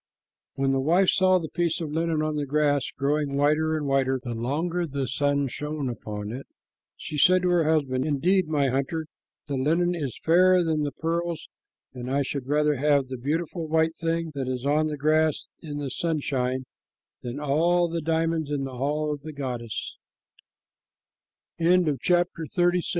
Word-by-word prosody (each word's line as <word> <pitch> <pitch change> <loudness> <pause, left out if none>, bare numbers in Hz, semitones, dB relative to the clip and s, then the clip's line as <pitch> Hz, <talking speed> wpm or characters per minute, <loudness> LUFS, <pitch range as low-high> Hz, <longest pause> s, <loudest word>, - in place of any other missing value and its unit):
When 135 0 +1
the 135 - +1
wife 175 +7 +3
saw 185 0 +4
the 165 -3 -3
piece 170 0 -1
of 160 -3 -4
linen 160 0 0
on 155 0 -1
the 145 -1 -2
grass, 145 -1 +1
growing 140 0 0
whiter 155 +2 +2
and 150 - -3
whiter 135 -1 +1
the 120 - -4
longer 160 +9 -1
the 140 -2 -3
sun 140 +2 +1
shone 150 +1 -3
upon 105 -3 -6
it, 130 +4 -7 0.5
she 150 -1 -5
said 185 +4 +5
to 180 - +2
her 175 -2 +3
husband, 135 -5 +1
"Indeed, 170 +5 +2
my 145 -3 +1
hunter, 140 +5 -1 0.4
the 140 -2 -3
linen 165 +6 +2
is 145 -8 -4
fairer 180 +2 +5
than 160 -2 0
the 145 -1 -1
pearls, 165 +2 -3 0.5
and 125 -1 -6
I 140 +1 +1
should 135 -1 -4
rather 150 0 +2
have 140 -1 +2
the 130 - -4
beautiful 160 +5 -2
white 160 +1 +2
thing 165 -1 -2
that 135 -2 -3
is 130 0 -3
on 150 +2 +2
the 150 -1 -4
grass 155 +1 +1
in 150 -2 -6
the 140 -2 -4
sunshine 130 -5 -1 0.6
than 120 +3 -5
all 170 +5 +2
the 165 0 -3
diamonds 160 -1 0
in 145 -2 -1
the 130 -2 -6
hall 150 +3 -1
of 145 - -7
the 155 +1 -8
150 Hz, 165 wpm, -26 LUFS, 135-165 Hz, 0.6 s, said